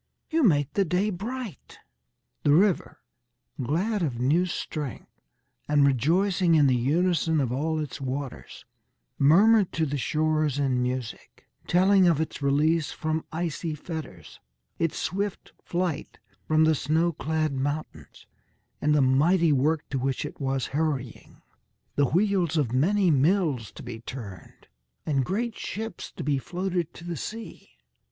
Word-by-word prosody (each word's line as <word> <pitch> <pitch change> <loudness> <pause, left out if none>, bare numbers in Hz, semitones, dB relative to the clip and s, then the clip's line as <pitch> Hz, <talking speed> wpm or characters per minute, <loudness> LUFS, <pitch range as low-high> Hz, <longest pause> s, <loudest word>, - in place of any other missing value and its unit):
You 325 +1 +2
make 150 - +3
the 200 - +2
day 185 +4 0
bright." 220 - -6 0.6
The - - +1
river, 185 +3 +2 0.6
glad 185 - 0
of 130 -8 -2
new 155 +9 +2
strength 150 -6 -6 0.5
and 145 -1 +4
rejoicing 170 - +2
in 150 -2 +5
the 130 -2 +4
unison 160 +5 +1
of 130 -4 0
all 155 +5 -1
its 150 -2 -5
waters, 135 0 -6 0.5
murmured 195 +8 +5
to 160 - +1
the 145 -1 -2
shores 155 0 0
in 130 -3 +1
music, 125 -2 -5 0.2
telling 185 +1 +4
of 165 -4 +3
its 160 -1 -3
release 150 +3 +2
from 155 -1 -2
icy 160 -1 -3
fetters, 160 -1 -8 0.4
its 165 -2 0
swift 200 +1 -3
flight 175 -3 -3 0.3
from 155 0 +4
the 160 0 +4
snow 160 +4 +1
clad 155 -1 -1
mountains, 135 - -5 0.6
and 150 0 +3
the 150 - +4
mighty 155 +6 +3
work 150 +3 +1
to 135 - -1
which 135 +2 -1
it 150 - -9
was 135 -1 -1
hurrying 140 -6 -3 0.5
the 145 - +3
wheels 180 -3 +1
of 130 -6 0
many 180 +7 +3
mills 145 - +1
to - - -10
be 120 -2 -7
turned, 105 -8 -10 0.4
and 140 -4 +1
great 225 - -2
ships 225 +2 -6
to 170 - -6
be 145 -1 +1
floated 180 +1 -3
to - - -11
the 175 0 -4
sea. 220 - -7
155 Hz, 145 wpm, -26 LUFS, 140-180 Hz, 0.6 s, in